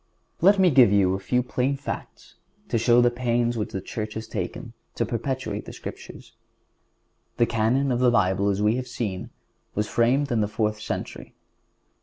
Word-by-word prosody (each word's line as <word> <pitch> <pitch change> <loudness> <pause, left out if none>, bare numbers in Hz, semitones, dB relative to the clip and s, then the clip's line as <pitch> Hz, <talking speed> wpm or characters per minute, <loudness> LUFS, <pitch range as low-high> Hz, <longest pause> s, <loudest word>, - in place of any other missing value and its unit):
Let 200 +4 +6
me 185 -2 +5
give 125 -7 +6
you 95 -2 +3
a 95 - -2
few 125 +5 0
plain 130 +2 -1
facts 140 - -7 0.4
to 115 - +1
show 120 +1 +5
the 120 0 +4
pains 120 -1 0
which 105 -2 -3
the 95 - -4
Church 110 +2 -5
has 110 0 -5
taken - - -5 0.2
to - - 0
perpetuate 115 -3 -3
the - - -9
Scriptures. - - -10 1.0
The 120 - +4
Canon 120 +5 +1
of 120 - 0
the 125 -1 +4
Bible, 100 -3 +2
as 100 +1 0
we 110 +3 +3
have 130 -1 -4
seen, 100 -6 -4 0.5
was 105 +1 0
framed 130 +6 +1
in 115 -2 +2
the 105 - +1
fourth 105 0 -2
century. - - -6
115 Hz, 180 wpm, -25 LUFS, 105-125 Hz, 1.0 s, Let